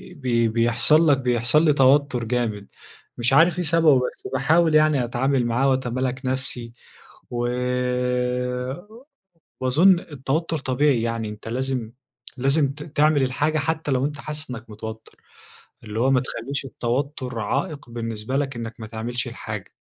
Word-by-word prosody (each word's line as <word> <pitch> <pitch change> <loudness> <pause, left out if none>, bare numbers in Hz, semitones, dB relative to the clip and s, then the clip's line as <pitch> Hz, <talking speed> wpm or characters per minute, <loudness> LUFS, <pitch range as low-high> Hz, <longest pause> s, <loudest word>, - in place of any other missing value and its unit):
بي 120 -5 +1
بيحصل 120 +8 +3
لك 140 - +5
بيحصل 125 +4 +3
لي 150 - +5
توتر 135 -2 +3
جامد، 115 -4 -2 0.5
مش 120 +2 +1
عارف 165 +4 +5
إيه - - 0
سببه، 160 -2 +4
بس 125 - -5
باحاول 155 +5 +3
يعني 155 -4 +4
أتعامل 125 +2 0
معاه 125 +4 +2
وأتمالك 130 0 -1
نَفسي. 130 -2 -4 0.6
و 120 0 -1 2.1
وأظن 165 +9 +5
التوتر 155 +2 -3
طبيعي 135 -2 +1
يعني، 115 -1 -2
أنت 105 +1 -10
لازم 125 -1 -2 0.5
لازم 135 +2 +2
ت 150 +1 -9
تعمل 150 -2 +2
الحاجة 145 +4 0
حتى 155 0 -1
لو 130 0 +1
أنت 145 0 -3
حاسس 150 0 -4
إنك 115 -2 -8
متوتر، 110 +1 -8 0.7
اللي 110 +1 -4
هو 130 +3 +3
ما 130 -1 +4
تخلّيش 135 +2 -4
التوتر 130 -1 -3
عائق 145 - -3
بالنسبة 115 +1 -4
لك 140 -2 -1
إنك 115 0 -6
ما 110 - -6
تعملش 115 +2 -4
الحاجة. - - -7
130 Hz, 140 wpm, -23 LUFS, 120-145 Hz, 2.1 s, لك